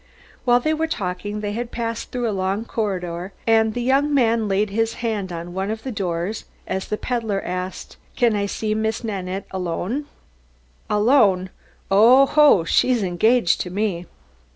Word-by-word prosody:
While 245 -1 +5
they 310 +5 0
were 320 +1 -1
talking, 205 - -4
they 205 -1 -3
had 235 +3 -4
passed 230 -1 -4
through 245 -1 -2
a - - 0
long 195 +3 -1
corridor 185 -5 -3
and 220 -1 +3
the 245 - -2
young 275 +4 +2
man 230 -5 +2
laid 200 +1 0
his 225 +2 0
hand 205 -5 -2
on 170 +1 -6
one 190 +2 -2
of 220 0 -4
the 265 - -4
doors 185 -1 -3 0.2
as 190 0 -3
the 210 - -2
peddler 225 -5 -2
asked, 180 +1 -5 0.2
"Can 235 -4 +2
I 200 0 0
see 215 +1 -2
Miss 220 +2 -1
Nanette 195 -3 -4
alone?" 190 - -3 0.8
"Alone? 210 -5 +3 0.4
Oho, 255 - +6
she's 240 +7 +2
engaged 185 +2 +2
to 180 - -4
me!" 185 -3 -2
210 Hz, 160 wpm, -22 LUFS, 190-235 Hz, 0.8 s, Oho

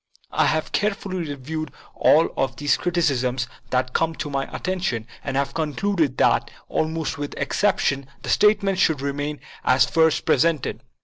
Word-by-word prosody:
I - - +3
have 155 0 0
care 210 -1 +1
fully 185 -5 -5
reviewed 145 +2 -5 0.2
all 160 +2 +4
of 135 -2 -1
these 145 +3 +2
criticisms 130 -8 0 0.2
that 130 0 0
came 165 0 +1
to 145 - -5
my 135 -1 -1
attention 180 - -2 0.2
and 135 -1 -2
have 140 0 0
concluded 160 -1 0
that, - - +3 0.2
almost 160 -1 -1
without 145 0 -5
excep 205 -2 +1
tion, 140 -1 0 0.2
the - - -5
statements 200 -2 +3
should 150 -4 +2
remain 145 +1 -3 0.2
as 130 -1 +4
first 160 -1 +2
presented. 165 -4 +1
150 Hz, 160 wpm, -23 LUFS, 135-170 Hz, 0.2 s, all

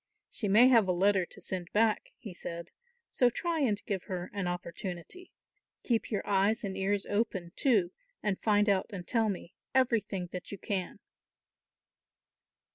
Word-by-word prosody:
"She 210 - -2
may 220 +6 +7
have 230 -6 +5
a - - +3
letter 190 0 +3
to - - -14
send 180 -2 -5
back," 220 0 +2
he 210 -7 -9
said, 170 -1 -7 0.4
"so 245 - +4
try 335 +6 -1
and 210 -8 0
give 195 -3 -3
her 180 -1 -5
an 200 -3 -2
opportunity. 175 - -6 0.5
Keep 230 -3 0
your 210 - -2
eyes 205 +3 +2
and 195 -2 -3
ears 195 +1 0
open 205 -5 -1
too, 205 -10 +3 0.3
and 200 -3 -1
find 210 -1 +3
out 195 -2 +2
and 185 -5 -7
tell 225 -3 +2
me 185 -2 -5 0.2
everything 210 -8 +1
that 180 -1 -6
you 200 - -5
can." 190 -1 -3
200 Hz, 160 wpm, -31 LUFS, 185-225 Hz, 0.5 s, may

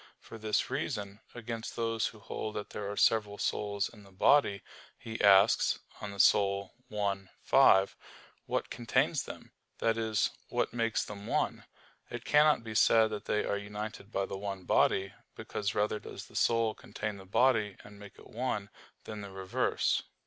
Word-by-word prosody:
For 115 - -11
this 110 -1 0
reason, 100 0 -3 0.2
against 115 -1 -6
those 115 -1 0
who 110 - -10
hold 110 0 -5
that 105 - -5
there 100 -1 -4
are 100 - -7
several 105 -2 +3
souls 100 -1 -1
in 110 - -15
the 100 -1 -17
body, 100 0 +3 0.3
he 110 0 -6
asks 100 +1 +5 0.2
(De - - -14
Anima 100 -1 +3 0.2
i, 100 -2 -2
5), 95 0 +5 0.5
"what - - -2
contains 120 -2 +1
them?" - - -10 0.3
that 115 0 +1
is, 110 -2 +1 0.2
what - - -1
makes 115 -2 0
them 105 0 -8
one? - - -1 0.4
It - - -7
cannot 150 -4 +4
be 110 -1 -6
said 110 0 +5
that 105 - -5
they 105 - 0
are 100 - 0
united 105 0 -7
by 100 -2 0
the 95 - -6
one 100 -2 -5
body; 95 +2 +2 0.2
because 105 0 -3
rather 105 +1 +1
does - - -9
the - - -18
soul 115 -2 +2
contain 105 -1 -6
the 95 - -12
body 110 -2 +2
and 105 -1 -14
make 100 -1 -12
it - - -15
one, 110 -4 -3 0.3
than 105 -1 -7
the 100 - -7
reverse. 95 -1 0
105 Hz, 170 wpm, -31 LUFS, 100-110 Hz, 0.5 s, asks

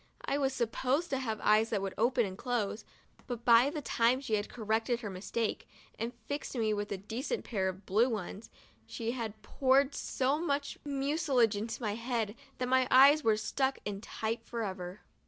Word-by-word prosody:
I 285 - 0
was 270 -1 +1
sup 235 -3 -1
posed 275 +8 0
to 270 - +1
have 220 -5 -3
eyes 215 +1 +4
that - - 0
would 195 -1 -3
open 240 +1 +2
and 190 -1 -6
close, 225 -1 -2 0.4
but 240 -2 -5
by 235 +3 +7
the 300 -1 -5
time 240 +2 +2
she 255 -5 -5
had 205 -1 0
corrected 225 +2 -1
her 210 -4 -5
mistake, 210 +4 -3 0.3
and 230 +2 -2
fixed 285 -1 -4
me 220 -2 +1
with 205 0 -3
a 200 - -1
decent 230 - -4
pair 190 -5 0
of 190 +1 -8
blue 220 +6 +3
ones, 215 0 -5 0.4
she 230 - -3
had 225 -4 -5
poured 270 +1 +3
so 275 +2 0
much 285 -4 -2
mucilage 275 -5 +1
into 225 +4 -4
my 210 -2 0
head 230 -2 -2 0.2
that 250 - -2
my 260 0 +3
eyes 280 +4 +7
were 220 -1 +3
stuck 265 +5 0
in 200 -1 -4
tight 225 +1 -3
forever. 195 -4 -5
235 Hz, 190 wpm, -32 LUFS, 215-265 Hz, 0.4 s, by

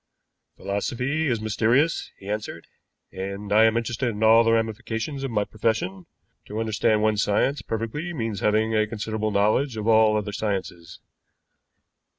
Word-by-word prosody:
"Philosophy 125 +10 -2
is 120 -4 0
mysterious," 115 +9 +1
he 95 - -13
answered, 105 -5 -4 0.5
"and 100 +2 -5
I 110 +1 +6
am 110 0 +3
interested 120 +2 -1
in 110 -1 -3
all 115 +1 +7
the 115 - +2
ramifications 115 +4 -2
of 135 - -2
my 105 -3 0
profession. 105 -3 -2 0.4
To 105 - -5
understand 110 -1 +1
one 110 -1 +2
science 105 +7 +1
perfectly 115 +10 -4
means 115 - -3
having 110 +2 +1
a 110 -1 +2
considerable 110 0 -3
knowledge 110 +5 +1
of 110 0 -3
all 110 -1 +5
other 105 -1 -3
sciences." 95 -5 -4
110 Hz, 150 wpm, -24 LUFS, 105-115 Hz, 0.5 s, all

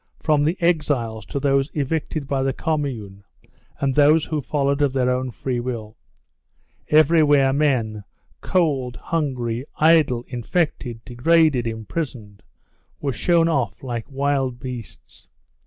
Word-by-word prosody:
From 150 -2 +2
the 160 +5 +1
exiles 140 - 0
to 140 - -3
those 135 0 +1
evicted 150 0 -2
by 135 -1 0
the 135 0 0
Commune 120 -12 -3 0.6
and 135 -1 0
those 150 +3 +4
who 155 -2 -2
followed 140 0 0
of 140 -2 +2
their 125 -1 +1
own 130 0 -1
free 125 +1 -3
will. 115 -3 -5 0.9
Everywhere 150 -3 +4
men, 120 -8 0 0.4
cold, 140 -9 0
hungry, 125 -8 -2
idle, 155 -7 +4
infected, 125 -2 -2
degraded, 135 0 +2
imprisoned, 110 -2 -5 0.6
were 140 -2 -2
shown 165 +7 +2
off 130 - -1
like 120 -3 -5
wild 135 -2 -1
beasts. 125 -3 -9
135 Hz, 125 wpm, -22 LUFS, 120-150 Hz, 0.9 s, those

